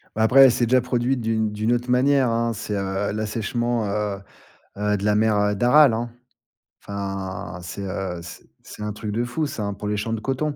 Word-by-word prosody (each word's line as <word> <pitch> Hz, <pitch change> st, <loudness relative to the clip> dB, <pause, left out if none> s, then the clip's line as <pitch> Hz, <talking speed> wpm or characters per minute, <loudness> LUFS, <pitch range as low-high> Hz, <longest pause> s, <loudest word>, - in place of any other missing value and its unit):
Bah, 110 Hz, -, +1 dB
après, 125 Hz, +5 st, +6 dB
elle 130 Hz, -, +6 dB
s'est 120 Hz, 0 st, +1 dB
déjà 130 Hz, +2 st, +3 dB
produite 125 Hz, +1 st, 0 dB
d'une 110 Hz, -1 st, 0 dB
d'une 110 Hz, +2 st, -1 dB
autre 120 Hz, +1 st, -2 dB
manière, 130 Hz, +1 st, +3 dB
hein. 115 Hz, 0 st, 0 dB
C'est, 105 Hz, -1 st, -4 dB
heu, 95 Hz, 0 st, -2 dB
l'assèchement, 110 Hz, +2 st, -2 dB
heu 105 Hz, 0 st, -2 dB, 0.6 s
heu, 105 Hz, 0 st, 0 dB
de 100 Hz, -, -6 dB
la 105 Hz, 0 st, +2 dB
mer, 110 Hz, 0 st, +3 dB
heu, 105 Hz, 0 st, +1 dB
d'Aral, 125 Hz, +4 st, +5 dB
hein. 115 Hz, +1 st, -3 dB, 0.7 s
Enfin, 95 Hz, -2 st, -5 dB
c'est, 95 Hz, +3 st, -7 dB
heu, 95 Hz, -2 st, -4 dB
c'est 85 Hz, 0 st, -10 dB, 0.2 s
c'est 105 Hz, -, -9 dB
un 105 Hz, -, -2 dB
truc 105 Hz, 0 st, -5 dB
de 115 Hz, +3 st, -1 dB
fou, 125 Hz, +6 st, -2 dB
ça, 115 Hz, -, -5 dB
hein, 100 Hz, 0 st, -2 dB
pour 100 Hz, +1 st, -6 dB
les 105 Hz, 0 st, -1 dB
champs 110 Hz, +2 st, -2 dB
de 115 Hz, -, -2 dB
coton. 135 Hz, +5 st, -2 dB
110 Hz, 215 wpm, -23 LUFS, 100-120 Hz, 0.7 s, après